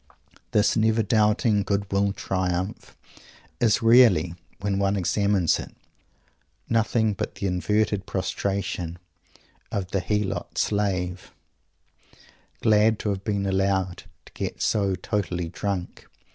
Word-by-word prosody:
This 105 - +2
"never 110 0 +2
doubting 105 -1 +2
good 100 0 -2
will 100 0 +2
triumph" 95 0 -3 0.6
is 115 -1 +2
really, 115 -8 +5 0.3
when 100 0 -1
one 100 0 +1
examines 100 -1 +1
it, - - -9 0.9
nothing 110 -1 +1
but - - -4
the - - -4
inverted 100 +3 0
prostration 95 -2 -2 0.7
of 95 -2 -3
the 95 - +1
helot 105 +2 -2
slave, 95 -3 -1 1.3
glad 110 0 +4
to 105 - -3
have 100 -1 -2
been 100 -2 -1
allowed 95 -1 0 0.2
to - - -17
get - - -4
so 100 -3 +1
totally 90 -4 -2
drunk! 95 0 -4
100 Hz, 115 wpm, -25 LUFS, 95-105 Hz, 1.3 s, really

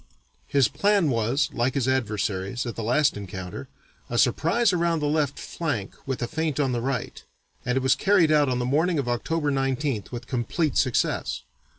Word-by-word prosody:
His 140 -3 +3
plan 200 -7 +2
was, 120 +5 +1
like 120 +2 0
his 135 -3 0
adversary's 110 -3 -1
at 120 - -4
the - - -4
last 130 +6 +2
encounter, 95 -2 -7 0.4
a 120 - -2
surprise 170 - +3
around 170 -2 +1
the 150 - -1
left 145 -2 0
flank 145 - -3
with 130 -2 -2
a - - -1
feint 155 0 -2
on 135 -3 +2
the 120 -1 -1
right, 130 -1 -3 0.4
and 125 +1 -1
it 130 - 0
was 130 - +5
carried 190 -6 +3
out 150 -2 +4
on 125 - 0
the 125 - -1
morning 160 +6 +1
of 140 -4 -1
October 145 +5 -1
19th 135 -4 -1
with 120 -1 -6
complete 130 +5 -1
success. 130 -4 0
130 Hz, 185 wpm, -25 LUFS, 120-155 Hz, 0.4 s, was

